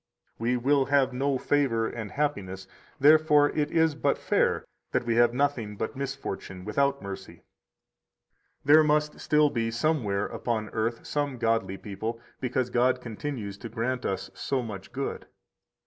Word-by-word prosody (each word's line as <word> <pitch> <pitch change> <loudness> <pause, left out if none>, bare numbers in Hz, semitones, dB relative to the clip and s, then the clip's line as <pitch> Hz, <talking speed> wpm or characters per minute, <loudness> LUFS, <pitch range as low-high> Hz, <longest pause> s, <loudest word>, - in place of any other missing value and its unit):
We 120 +2 +1
will 135 +2 +3
have 135 -2 +2
no 135 +1 0
favor 125 -5 +1
and 110 -4 -6
happiness, 100 -11 -2 0.3
therefore 150 0 +6
it 150 -1 0
is 160 -2 +3
but 145 - +1
fair - - +1 0.3
that - - +1
we 115 - +1
have 120 0 +5
nothing 125 -5 -1
but 110 - -4
misfortune 130 -9 -5
without 140 +4 +1
mercy. 95 -3 -8 1.2
156 - - -37
There 155 +2 +7
must 150 0 +1
still 150 -1 +4
be 115 -1 0
somewhere 115 -6 0
upon 110 -3 -2
earth 115 +1 -2
some 145 -3 -2
godly 115 -4 0
people 110 +4 -5 0.2
because 125 -1 -1
God 125 +1 +3
continues 115 -4 -5
to 115 - -7
grant 120 +3 -2
us 95 0 -3
so 130 +6 -2
much 100 -4 -8
good! 135 +3 -4
125 Hz, 150 wpm, -27 LUFS, 110-145 Hz, 1.2 s, There